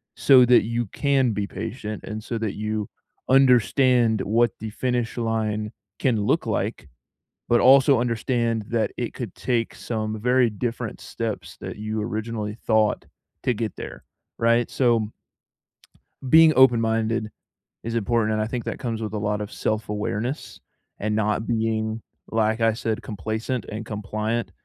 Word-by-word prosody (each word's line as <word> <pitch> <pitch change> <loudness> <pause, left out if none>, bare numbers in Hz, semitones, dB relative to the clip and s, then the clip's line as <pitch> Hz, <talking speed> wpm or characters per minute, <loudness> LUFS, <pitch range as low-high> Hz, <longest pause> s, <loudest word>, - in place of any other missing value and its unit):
so 130 -3 +6
that 125 0 +5
you 115 +2 -1
can 135 0 +1
be 100 -1 -2
patient 110 -3 -6
and 110 0 -6
so 115 -1 -3
that 110 -3 -2
you 105 -1 -3 0.4
understand 125 -3 +4
what 115 +2 +2
the 110 - -5
finish 120 +1 -2
line 110 -2 -1 0.3
can 115 -6 +1
look - - +1
like, - - -2 0.6
but 120 - +5
also 135 0 +6
understand 115 -1 0
that 115 -3 0
it 120 - -4
could 115 -9 -6
take 120 -3 -1
some 110 -2 -3
very 125 +1 +3
different 115 +1 -4
steps 100 -6 -5
that 90 0 -6
you 110 +1 -3
originally 110 -1 -4
thought 110 -1 +2 0.4
to 125 - +1
get 110 -2 -3
there, - - -8 0.3
right, 115 +1 +2
so 115 -4 +2 1.2
being 160 0 +8
open-minded 115 -3 +3 0.5
is 115 +1 -3
important, 115 0 +1
and 110 - 0
I 110 - -1
think 120 0 -4
that - - -4
comes 115 -3 -3
with 110 -1 -4
a 105 - -1
lot 105 0 -1
of 105 - -6
self-awareness 110 +4 -3 0.4
and 105 +1 -1
not 105 +1 0
being, 110 -1 -1 0.3
like 110 0 +1
I 115 -1 +3
said, 115 0 -2
complacent 110 +4 -3
and 110 +1 -5
compliant 110 +2 -3
115 Hz, 150 wpm, -24 LUFS, 110-120 Hz, 1.2 s, being